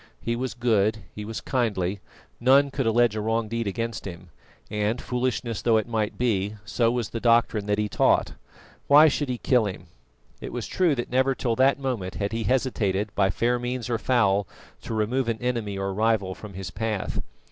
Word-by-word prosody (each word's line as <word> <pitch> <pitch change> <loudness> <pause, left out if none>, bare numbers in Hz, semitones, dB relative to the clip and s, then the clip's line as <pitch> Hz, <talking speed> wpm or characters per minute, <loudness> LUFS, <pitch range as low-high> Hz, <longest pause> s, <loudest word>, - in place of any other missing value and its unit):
He 115 - -2
was 125 -1 -3
good, 110 -3 +1
he 105 - -6
was 110 +1 -5
kindly, 105 -6 -1 0.4
none 135 +3 +5
could 135 -3 -1
allege 115 0 +3
a 110 - -2
wrong 115 +1 0
deed 115 0 -2
against 115 +3 -3
him; 90 -1 -10 0.4
and, 105 +3 0
foolishness 125 -3 -2
though 115 -2 +3
it 110 - -1
might 110 -3 -2
be, 105 -4 0
so 115 +3 +1
was 120 -3 -1
the 115 - -4
doctrine 115 -3 +2
that 105 0 +1
he 105 0 0
taught. - - +2 0.5
Why 150 +2 +8
should 145 -1 0
he 125 - -1
kill 120 -3 +2
him? 95 - -7 0.5
It - - -7
was - - -4
true 175 -6 +1
that 120 -1 -4
never 130 +1 +2
till 120 -3 -1
that 135 +1 +4
moment 120 -10 -3
had 100 0 -2
he 115 -1 -2
hesitated, 105 -6 0
by 95 -1 +2
fair 120 +6 +1
means 125 0 -3
or 115 - 0
foul, 100 -6 +2 0.3
to 115 - -5
remove 115 +4 0
an 115 - -1
enemy 115 -5 -2
or 95 0 -2
rival 105 -2 +1
from 100 0 -11
his 95 -1 -6
path. 110 0 -2
115 Hz, 195 wpm, -25 LUFS, 105-125 Hz, 0.5 s, Why